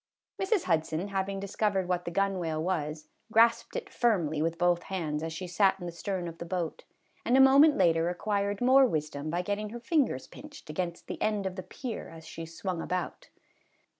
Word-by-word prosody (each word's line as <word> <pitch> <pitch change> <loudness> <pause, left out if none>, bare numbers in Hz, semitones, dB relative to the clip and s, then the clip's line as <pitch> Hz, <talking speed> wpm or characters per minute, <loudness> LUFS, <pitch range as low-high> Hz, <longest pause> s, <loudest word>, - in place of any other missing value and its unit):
Mrs. 385 -1 +2
Hudson 160 +4 0
having 195 0 -2
discovered 200 -1 0
what 180 -1 -1
the 170 - -3
gunwale 175 -4 0
was, 155 -3 -2 0.2
grasped 230 +1 +4
it - - -3
firmly 170 -11 +1
with 165 +1 0
both 175 0 +2
hands 155 -6 -2
as 160 0 -3
she 165 +3 -5
sat 190 +2 +2
in 175 - -6
the 175 - -4
stern 180 +1 -3
of 165 0 -8
the - - -4
boat, 170 -2 -4 0.4
and 250 - +3
a - - +6
moment 280 +3 +7
later 165 0 +3
acquired 200 +2 -1
more 260 +2 +6
wisdom 150 -5 -3
by 175 +3 -1
getting 205 +2 -2
her 240 +3 -7
fingers 255 - +1
pinched 290 - -11
against 170 +1 -4
the - - -7
end 210 -2 0
of 190 -1 -3
the 185 - -4
pier 240 +5 -6
as 160 -1 -12
she 165 0 -7
swung 170 +1 -4
about. 180 +1 -4
185 Hz, 195 wpm, -29 LUFS, 165-210 Hz, 0.4 s, moment